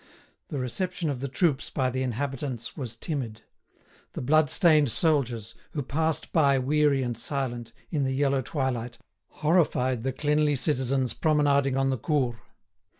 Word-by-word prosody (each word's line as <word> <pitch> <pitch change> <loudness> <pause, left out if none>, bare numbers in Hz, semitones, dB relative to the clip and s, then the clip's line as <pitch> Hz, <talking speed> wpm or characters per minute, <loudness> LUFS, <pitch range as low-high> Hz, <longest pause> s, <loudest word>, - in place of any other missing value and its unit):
The 145 - -5
reception 165 +6 -2
of 130 - -4
the 140 - -3
troops 145 0 0
by 130 -2 0
the 130 +1 -2
inhabitants 130 -1 -3
was 125 -6 -6
timid; 115 -5 -5 0.7
the - - -5
bloodstained 155 +1 +4
soldiers, 125 -7 +1 0.2
who 145 - -2
passed 160 +3 -1
by 140 -4 +4
weary 140 +1 +2
and 120 -1 -2
silent, 120 -2 -4 0.2
in 150 -4 0
the 130 - 0
yellow 140 -1 +2
twilight, 125 -4 -3 0.5
horrified 130 -7 +2
the 135 - 0
cleanly 150 +2 +1
citizens 130 -2 0
promenading 140 -4 +2
on 135 0 +2
the 130 - -2
Cours. 130 -3 0
135 Hz, 145 wpm, -27 LUFS, 125-150 Hz, 0.7 s, bloodstained